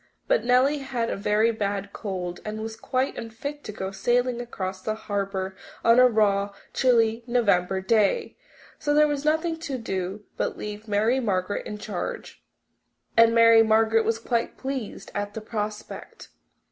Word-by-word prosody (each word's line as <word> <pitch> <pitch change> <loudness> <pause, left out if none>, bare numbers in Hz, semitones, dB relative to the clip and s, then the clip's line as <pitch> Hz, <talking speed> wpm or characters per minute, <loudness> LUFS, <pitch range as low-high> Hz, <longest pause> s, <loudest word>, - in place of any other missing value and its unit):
But - - +2
Nellie 260 +4 +3
had 250 -4 -2
a - - -1
very 210 +3 +2
bad 200 -2 -3
cold 180 -4 -4
and 215 0 -5
was 220 0 -5
quite 255 +3 -2
unfit 280 +6 -6
to - - -5
go 190 -2 -5
sailing 240 +4 +1
across 190 -5 -5
the 215 +2 -2
harbour 195 -3 -3 0.3
on 230 +2 +6
a 255 - +8
raw, 205 -3 +1 0.2
chilly 230 -2 +3
November 195 -6 +2
day. 220 - +1 0.4
So 290 0 0
there 300 0 +6
was 290 -1 -2
nothing 320 +2 +1
to 285 -5 -4
do 195 -2 -4
but - - -2
leave 210 +1 -7
Mary 220 +5 +2
Margaret 200 -4 -1
in 210 - -5
charge, 210 -3 -6 0.7
and 230 0 +6
Mary 230 0 +7
Margaret 225 0 +4
was 225 +1 0
quite 230 0 -2
pleased 260 -7 -5
at 205 0 -4
the 220 - -4
prospect. 215 -1 -6
220 Hz, 160 wpm, -25 LUFS, 205-245 Hz, 0.7 s, a